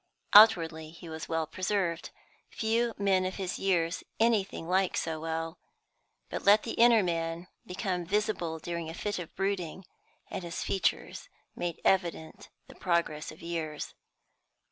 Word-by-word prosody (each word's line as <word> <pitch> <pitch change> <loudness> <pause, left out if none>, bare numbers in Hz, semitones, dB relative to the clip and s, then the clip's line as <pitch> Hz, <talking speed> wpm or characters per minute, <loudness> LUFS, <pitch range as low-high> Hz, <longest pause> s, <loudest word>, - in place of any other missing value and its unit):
Outwardly 165 -7 +7
he 170 +1 -12
was 160 0 -6
well 165 -1 0
preserved 185 -1 -1 0.4
few 230 +1 0
men 195 -2 +2
of 185 0 -3
his 190 -2 -3
years 170 -3 +1 0.2
anything 215 -7 +1
like 185 +1 +1
so 160 -1 -2
well. 165 +1 -3 0.7
But - - -5
let 205 +2 +6
the 230 - -4
inner 230 -2 +5
man 165 0 -2 0.2
become 180 -1 -2
visible 200 -4 -1
during 170 0 -5
a 165 - -7
fit 205 0 -3
of 170 - -8
brooding, 190 -2 -2 0.5
and 185 - -4
his 170 0 -4
features 190 -3 -1 0.3
made 175 -2 -3
evident 170 -4 0 0.2
the - - -12
progress 170 -4 -1
of 155 - -14
years. 160 -3 -4
175 Hz, 145 wpm, -30 LUFS, 165-195 Hz, 0.7 s, Outwardly